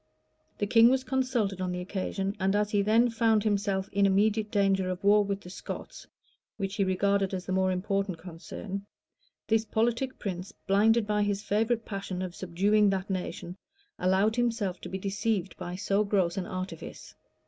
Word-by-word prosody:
The 205 - 0
king 230 +2 +6
was 260 0 +2
consulted 255 -8 0
on 185 -1 -1
the 180 - -3
occasion; 195 +1 -3
and 195 +1 +1
as 210 0 +1
he 205 - +3
then 225 +4 +3
found 225 -2 +2
himself 200 -2 0
in 200 0 +3
immediate 210 +2 +2
danger 195 -2 +2
of 185 +2 -4
war 205 +1 +5
with 200 0 -3
the 180 - -11
Scots, - - -8 0.5
which 195 -1 -3
he 200 - +3
regarded 195 +1 +1
as 185 - -5
the - - -4
more 190 0 +2
important 195 0 -1
concern, 185 +4 -7 0.6
this 220 0 +2
politic 235 +4 0
prince, 190 +1 -5
blinded 215 +3 +4
by 210 0 +1
his 205 0 0
favorite 225 +3 0
passion 195 -2 -4
for 185 -1 -3
subduing 200 +4 +2
that 195 0 -2
nation, 180 -1 -4 0.4
allowed 190 +4 +2
himself 225 -6 0
to - - -7
be 190 - -3
deceived 200 0 -2
by 175 0 -5
so 200 +1 +1
gross 190 -4 +1
an 185 -2 -3
artifice. 185 -3 -7
200 Hz, 175 wpm, -29 LUFS, 190-215 Hz, 0.6 s, king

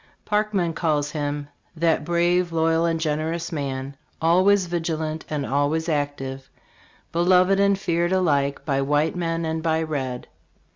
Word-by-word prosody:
Parkman 210 -5 0
calls 150 -3 0
him, 145 -1 -3
" - - -44
That 165 -1 +1
brave, 175 +2 +1
loyal 165 0 +2
and 165 -1 0
generous 160 +2 -2
man, 140 -3 -4 0.2
always 185 +4 +4
vig 170 -1 -3
ilant 160 -1 -3
and 150 -2 -2
always 145 +4 0
active, 145 -3 -3 0.6
beloved 180 +3 +4
and 200 0 +3
feared 170 -2 0
alike 145 -7 +1
by 135 -2 +1
white 145 +4 +1
man 165 -1 -1
and 160 0 -2
by 160 0 +1
red." 130 -5 -3
160 Hz, 145 wpm, -23 LUFS, 145-175 Hz, 0.6 s, always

